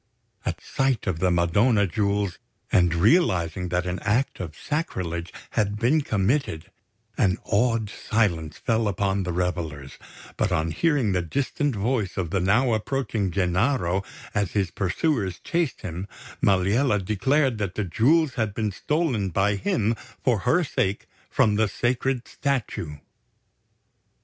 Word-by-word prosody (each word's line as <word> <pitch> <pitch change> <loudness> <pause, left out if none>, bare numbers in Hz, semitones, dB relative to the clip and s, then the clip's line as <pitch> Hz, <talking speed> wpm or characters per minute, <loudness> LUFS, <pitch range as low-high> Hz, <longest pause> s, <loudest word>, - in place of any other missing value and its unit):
At - - -2
sight 135 -4 0
of 90 -6 -1
the 90 +1 +2
Madonna 100 +6 +3
Jewels, 100 0 -1 0.3
and 90 -2 +4
realising 90 - +2
that 90 +1 0
an 90 +1 -2
act 115 +6 0
of 80 -4 -6
sacrilege 90 - -3 0.2
had 105 -2 0
been 125 +8 +3
committed, 110 - -1 0.5
an 95 -2 +3
awed 115 0 +1
silence 90 -8 -1
fell 115 -1 0
upon 100 0 0
the 90 -1 -2
revellers; 85 -6 -3 0.4
but - - +1
on 80 +1 0
hearing 145 - +2
the 90 -1 +1
distant 140 - -1
voice 105 -3 -1
of 90 -4 -2
the 95 - +1
now 110 +7 +3
approaching 110 -3 -1
Gennaro 95 +1 +1 0.3
as 100 -3 -1
his 95 -5 0
pursuers 100 - 0
chased 170 -5 -1
him, 90 +3 -5 0.3
Maliella 100 +5 +3
declared 130 +4 +1
that 100 -3 -2
the 105 - -1
Jewels 140 - +3
had 110 -5 -2
been 110 -2 -1
stolen 130 - 0
by 100 +4 +2
him 100 +3 +1 0.3
for 120 -5 +2
her 125 - +2
sake 100 - -1 0.2
from 105 -1 +3
the 110 0 +3
sacred 125 +3 -1
statue. 120 - -2
100 Hz, 140 wpm, -25 LUFS, 90-125 Hz, 0.5 s, and